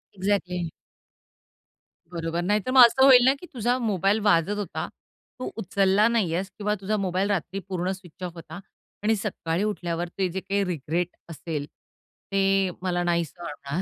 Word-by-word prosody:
Exactly. 185 -3 -1 1.4
बरोबर. 165 0 -2
नाही 205 +4 +2
तर 255 - -1
मग 255 -2 +10
असं 265 +3 +3
होईल 250 -2 +8
ना, 265 - +6
की - - -10
तुझा 245 +1 +1
मोबाईल 205 -2 +1
वाजत 205 0 +3
होता. 205 -2 -4 0.5
तू 255 - -3
उचलला 200 +1 +3
नाही 220 -8 +1
आहेस. 190 +3 -2
किंवा 210 -1 0
तुझा 210 +2 0
मोबाईल 190 +1 0
रात्री 195 0 -1
पूर्ण 185 0 -1
स्विच 185 -2 -10
ऑफ 175 - -4
होता. 165 +1 -9 0.4
आणि 220 +1 +3
सकाळी 190 -4 -2
उठल्यावर 175 -5 -2
ते 190 - +1
जे 190 - -3
काही 200 +1 -1
रिग्रेट 170 0 -1 0.2
असेल, 155 -2 -4 0.7
ते 195 -1 +2
मला 175 -1 0
नाही 170 -1 +1
सोडणार. 150 0 -6
190 Hz, 160 wpm, -25 LUFS, 175-205 Hz, 1.4 s, मग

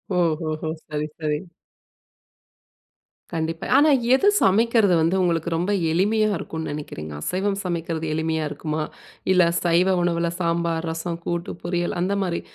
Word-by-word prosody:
ஓஹோஹோ! 160 -2 0 0.2
சரி, 150 0 -2
சரி. 150 -2 -1 1.9
கண்டிப்பா. 165 0 -2
ஆனா 300 +2 +6 0.3
எது 395 - +2
சமைக்கிறது 220 -1 +4
வந்து 165 +4 +2
உங்களுக்கு 170 -1 +1
ரொம்ப 180 +5 0 0.2
எளிமையா 215 +5 +2
இருக்கும்ன்னு 160 -1 -5
நெனக்கிறீங்க? 80 - -6
அசைவம் 195 - -1
சமைக்குறது 165 -2 -2
எளிமையா 160 0 -1
இருக்குமா? 155 +1 -3 0.5
இல்ல 180 -1 +6 0.2
சைவ 180 +2 +3
உணவுல 170 -1 +1
சாம்பார், 170 -1 0
ரசம், 165 +1 -4
கூட்டு 170 0 -2
பொரியல் 175 0 -1
அந்த 195 +2 +1
மாரி 170 -2 -2
170 Hz, 125 wpm, -23 LUFS, 160-180 Hz, 1.9 s, ஆனா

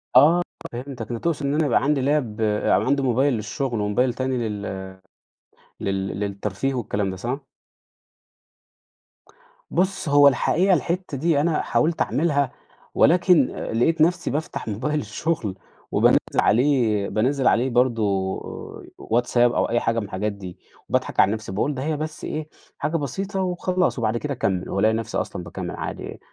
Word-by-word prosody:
آه 155 +7 +7 0.3
فهمتك 125 +3 -6 0.2
أنت 115 - -5
تقصد 160 -4 0
إن 140 - 0
أنا 160 - +2
يبقى 130 - +2
عندي 145 -1 +2
لاب 130 -6 0
أو 105 -1 +2
عندي 140 +1 +1
موبايل 130 +2 +2
للشغل 115 +1 -2
وموبايل 120 +5 +1
تاني 130 -3 -1
لل 95 -2 -5 0.9
لل 95 0 -2
للترفيه 100 +5 -2
والكلام 105 -4 -1
ده - - -6
صح؟ 125 +8 -3 2.3
بص 185 -3 0
هو 145 0 +7
الحقيقة 180 +7 +3
الحتّة 170 0 -1
دي 155 0 +2
أنا 160 0 +1
حاولت 160 +1 +1
أعملها 145 -4 +1 0.4
ولكن 175 -5 +4
آآ - - -4
لقيت 160 +8 +2
نفسي 170 -2 +2
بافتح 150 -4 -4
موبايل 150 +9 -1
الشغل 110 - -2 0.4
وبانزّل - - +5 0.2
عليه 115 -5 +2
بانزّل 130 +4 +1
عليه 125 +3 +3
برضو 110 -6 +1 0.6
WhatsApp 120 +2 0
أو 120 0 +3
أي 120 0 +2
حاجة 115 0 0
من 105 - -4
الحاجات 105 +2 -2
دي 95 -3 -9 0.3
وباضحك - - -1
على 100 - +6
نفسي، 110 -3 -4
باقول 110 +10 0
ده 130 - -4
هي 155 0 -1
بس 155 +1 -5
إيه 155 0 -4 0.3
حاجة 165 +2 -1
بسيطة 190 - -3
وخلاص 180 -4 0
وبعد 110 0 0
كده 145 +3 -3
أكمل 95 -7 -1
وألاقي 110 +3 +2
نفسي 115 -1 -2
أصلًا 90 - -3
باكمل 85 +1 -6
عادي - - -6
125 Hz, 155 wpm, -23 LUFS, 105-150 Hz, 2.3 s, آه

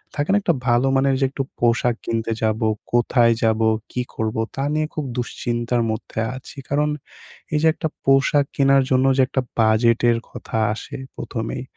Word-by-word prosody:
থাকে 145 0 -2
না? 205 - +4
একটা 175 - +2
ভালো 120 +2 +3
মানের 135 0 +3
যে 135 - +3
একটু 135 0 -3 0.2
পোশাক 120 0 +2
কিনতে 115 0 -2
যাবো, 110 0 +1 0.3
কোথায় 120 -1 +4
যাবো? 110 0 +2 0.2
কী 125 - -2
করবো? 110 0 -1
তা 135 - -2
নিয়ে 155 0 0
খুব 155 - -3
দুশ্চিন্তার 120 0 -1
মধ্যে 110 0 -5 0.2
আছি 130 +2 -11
কারণ 150 +1 +1 0.7
এই - - +3
যে - - +3
একটা 160 -1 -2 0.2
পোশাক 135 +1 +4
কেনার 135 0 +4
জন্য 130 0 +3
যে 135 - +5
একটা 130 - 0 0.2
বাজেটের 115 +2 +3
কথা - - -6 0.2
আসে - - -8 0.2
১ম 115 -2 -4
এই 125 - -4
125 Hz, 175 wpm, -21 LUFS, 115-135 Hz, 0.7 s, যে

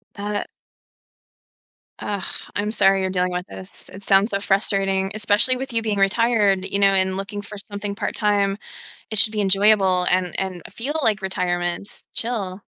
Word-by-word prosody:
That 205 +1 -4
it 205 - -3 1.5
Ugh, 200 -2 -4 0.3
I'm 210 +1 -2
sorry 195 -3 +3
you're 190 - -1
dealing 180 -1 -1
with 180 0 -4
this 95 -1 -8
it 195 - -11
sounds 195 +4 +3
so 200 - 0
frustrating, 195 -1 +2
especially 215 +4 +4
with 265 +1 -6
you 230 -1 0
being 215 -2 -2
retired, 200 -1 +2
you 195 +1 -1
know, 200 0 +4
and 190 -1 +1
looking 195 +1 -5
for 205 +1 -10
something 200 0 -5
part-time. 205 -2 0 0.5
It 215 - 0
should 220 +1 +7
be 210 - -1
enjoyable 195 -2 +3
and 180 -1 0
and 185 -2 -4
feel 265 +6 -4
like 210 -5 +1
retirement. 175 0 -3
Chill. 205 -5 -3
200 Hz, 165 wpm, -21 LUFS, 190-210 Hz, 1.5 s, should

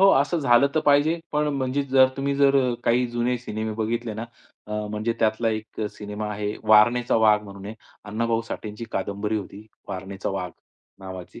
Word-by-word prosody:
हो, 195 - +7
असं 155 +5 0
झालं 125 -1 +5
तर 155 - +3
पाहिजे. 150 +4 +3
पण 150 0 +1
म्हणजे 130 +1 0
जर 130 -1 +5
तुम्ही 140 +1 -1
जर 140 -1 +5 0.3
काही 125 +1 +3
जुने 120 +1 0
सिनेमे 110 -2 -4
बघितले 115 +1 -2
ना, 115 +2 -4 0.4
अ, 105 - -7 0.2
म्हणजे 105 +2 -1
त्यातला 110 +1 +1
एक 110 0 -5
सिनेमा 105 +1 -6
आहे, 105 0 -3
वारणेचा 115 +3 +5
वाघ 110 -1 +5
म्हणून 100 -1 -10
आहे. 110 - -6 0.3
अण्णाभाऊ 115 +2 0
साठेची 105 +1 -6
कादंबरी 100 +3 -2
होती, 105 +1 -7 0.2
वारणेचा 95 +1 -5
वाघ, 95 -2 -3 0.5
नावाची. 95 -2 -9
110 Hz, 170 wpm, -24 LUFS, 105-125 Hz, 0.5 s, हो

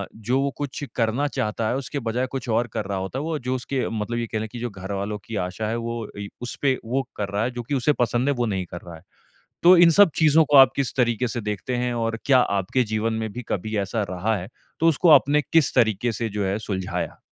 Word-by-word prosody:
जो 120 +4 -1
वो 140 - +1
कुछ 145 0 -5
करना 115 +4 +1
चाहता 110 -4 -2
है - - 0
उसके 140 +2 -4
बजाय 120 +1 -1
कुछ 135 -2 -5
और 115 +2 +1
कर 105 - -2
रहा 100 0 -3
होता 95 +7 -4
है। - - -3
वो 160 -1 -2
जो 125 0 -2
उसके 130 +1 -2
मतलब 110 +1 -3
ये 120 -1 -2
कह 110 - -3
रहे 110 - -3
कि 120 +2 -9
जो 120 +1 -3
घरवालों 100 +1 -4
कि 115 - -6
आशा 95 +4 -4
है 115 - -1
वो 115 -1 -4
ए 100 0 -5
उसपे 130 +2 -1
वो 130 +4 0
कर 100 -1 -3
रहा 100 +2 -1
है 125 - -1
जो 120 -1 -6
कि 140 +5 -2
उसे 135 +3 +2
पसंद 120 +2 +1
है - - +3
वो 120 -1 0
नहीं 95 -4 -2
कर 85 0 -9
रहा 85 -1 -10
है। 80 - -14 0.6
तो 180 +2 +9
इन 170 0 +7
सब 200 +1 +6
चीज़ों 160 0 +5
को 145 - +6
आप 135 -1 +8
किस 140 -2 -1
तरीके 120 0 +1
से 120 +1 -4
देखते 105 +4 -3
हैं? 125 0 -1
और 115 -1 -1
क्या 135 -2 +5
आपके 100 +2 +1
जीवन 110 0 -1
में 110 -1 -3
भी 125 - -5
कभी 110 +3 -2
ऐसा 100 +2 -1
रहा 95 +5 -1
है, 90 0 -6 0.3
तो 165 - +3
उसको 165 +2 +3
आपने 145 0 +6
किस 160 0 +2
तरीके 115 -1 +2
से 115 0 -3
जो 105 -1 -2
है 95 +2 0
सुलझाया? 95 -4 -4
115 Hz, 255 wpm, -23 LUFS, 105-130 Hz, 0.6 s, तो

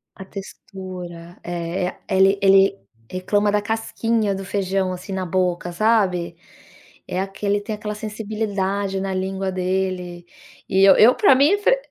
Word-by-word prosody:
A 190 - -10
textura, 185 -3 -9
é, 175 +1 -3
a - - -11
ele 195 0 +4
ele 195 0 +5 0.3
reclama 205 +3 0
da 210 0 +1
casquinha 225 0 -1
do 195 - -6
feijão, 190 -1 -1
assim, 185 +2 -7
na 190 -1 -2
boca, 180 0 -1
sabe, 180 -4 +1 0.7
é 180 - -3
aquele 200 +1 -2
tem 215 +1 -4
aquela 210 0 -5
sensibilidade 205 -2 -3
na 190 0 -3
língua 190 0 -2
dele 185 -1 -2 0.4
e 190 0 +3
eu 195 - +8
eu 235 +4 +7
pra 390 -11 +5
mim 290 +10 +4
fre - - +3
195 Hz, 145 wpm, -21 LUFS, 185-210 Hz, 0.7 s, eu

